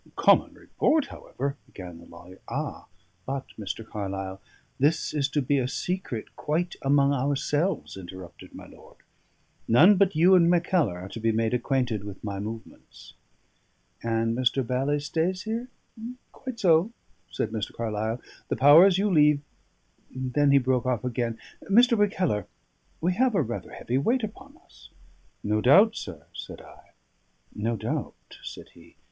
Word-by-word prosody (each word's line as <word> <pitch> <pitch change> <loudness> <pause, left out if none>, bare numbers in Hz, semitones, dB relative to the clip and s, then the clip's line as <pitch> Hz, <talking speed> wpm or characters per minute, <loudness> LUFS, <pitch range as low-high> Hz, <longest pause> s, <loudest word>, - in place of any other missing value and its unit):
"Common - - +4
report, 310 -3 +1
however 140 - -5
" - - -41
began 90 -3 -10
the 85 - -15
lawyer. 85 +2 -14
"Ah! - - -4 0.4
but, 135 0 -3
Mr. 110 +1 -6
Carlyle, 95 -2 -5 0.4
this 150 +4 +1
is 145 -3 +1
to 145 0 0
be 140 +1 +1
a 125 - 0
secret 175 - -4
quite 170 +4 -2
among 140 0 +3
ourselves," 145 +5 -1
interrupted 95 -1 -11
my - - -10
lord. - - -17 0.7
"None 175 - +6
but 195 -2 +3
you 175 +4 +5
and 170 -2 +6
Mackellar 175 - +2
are 95 - -8
to 115 - -7
be 115 0 +1
made 115 +1 0
acquainted 125 -4 0
with 100 -2 -9
my 100 -2 -4
movements." 110 +2 -9 0.9
"And 115 0 0
Mr. 130 +1 +1
Bally 135 +4 0
stays 165 +6 -1
here? 230 +3 -3 0.6
Quite 255 -3 -8
so," 175 +1 +4 0.4
said - - -3
Mr. 110 -2 -3
Carlyle. 110 +1 -3 0.3
"The - - -1
powers 165 +7 +7
you 200 +2 +1
leave 150 -5 +4 0.5
" - - -39 0.2
Then 145 -1 +3
he 140 - +6
broke 130 -1 +1
off 125 -4 0
again. 120 -2 -2 0.3
"Mr. 235 +4 +5
Mackellar, 185 - 0 0.5
we 175 +3 +1
have 245 +3 +2
a - - +3
rather 120 - -6
heavy 125 +3 -2
weight 240 - +1
upon 260 +8 -8
us." - - -18 0.5
"No 105 +1 0
doubt, 200 - +6
sir," 80 -7 -8
said - - -8
I. - - -17 0.6
"No 115 +3 -2
doubt," 110 +2 -3 0.3
said - - -9
he. - - -18
"Mr. - - -21
135 Hz, 155 wpm, -26 LUFS, 110-175 Hz, 0.9 s, powers